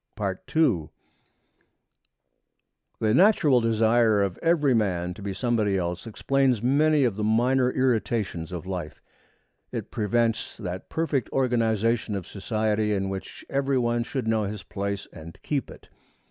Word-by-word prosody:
II 100 - 0 2.1
The 110 -1 +2
natural 160 - +5
desire 115 -1 +3
of 95 -3 -3
every 160 -5 +3
man 90 -6 0
to 100 - -12
be 100 0 -4
somebody 105 -1 0
else 90 +3 -3
explains 130 0 +1
many 150 +3 +3
of 115 -6 0
the 105 - -2
minor 125 +4 +3
irritations 115 -9 -1
of 90 -1 -6
life. 90 -5 -5 0.7
It - - -5
prevents 115 +1 0
that 90 -3 -6
perfect 155 -7 -1
organization 115 -3 +1
of 95 -3 -4
society 105 +1 -1
in 95 0 -1
which 95 0 -7
every 140 -1 0
one 120 -1 +1
should 125 -1 -4
know 110 -2 +1
his 105 0 -5
place 100 0 -4
and 85 0 -11
keep 140 -4 -2
it. - - -13
110 Hz, 135 wpm, -26 LUFS, 100-125 Hz, 2.1 s, natural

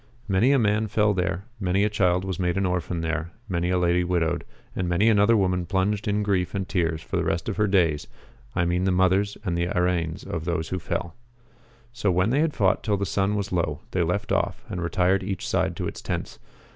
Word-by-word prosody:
Many 105 +6 +3
a 140 - +5
man 110 -2 +2
fell 105 0 +2
there; 95 0 -1
many 95 0 +1
a - - +4
child 90 -3 +2
was 95 -3 -3
made 90 0 0
an 95 - +1
orphan 90 -1 -1
there; 80 0 -2 0.2
many 90 -3 -1
a 90 - +2
lady 90 0 +2
widowed; 85 -1 0 0.3
and 90 -2 -1
many 90 +5 +3
another 110 +1 +5
woman 90 -3 +1
plunged 100 +3 0
in 105 0 +1
grief 95 -2 0
and 95 -2 -2
tears 80 -3 -1
for - - -3
the - - +1
rest 85 0 -1
of 110 - -3
her 105 -1 +3
days, 85 -7 +2 0.5
I 85 - +2
mean 90 +2 0
the 95 - +2
mothers 95 +2 +2
and 85 - 0
the 85 0 0
araines 90 -2 -1
of 80 -2 -4
those 85 -2 -2
who 95 - -2
fell.^ 85 0 -3 0.8
So 105 -4 0
when 90 +4 +2
they 135 - +2
had 160 -1 +1
fought 95 -4 +2
till 105 -2 0
the 100 - -1
sun 100 +1 0
was 100 -2 -2
low 80 -4 -1
they 90 - 0
left 95 +5 -1
off, - - -1
and 90 - -4
retired 90 +2 +2
each 95 -1 -4
side - - 0
to - - -3
its - - -6
tents. - - -4
90 Hz, 225 wpm, -25 LUFS, 85-100 Hz, 0.8 s, a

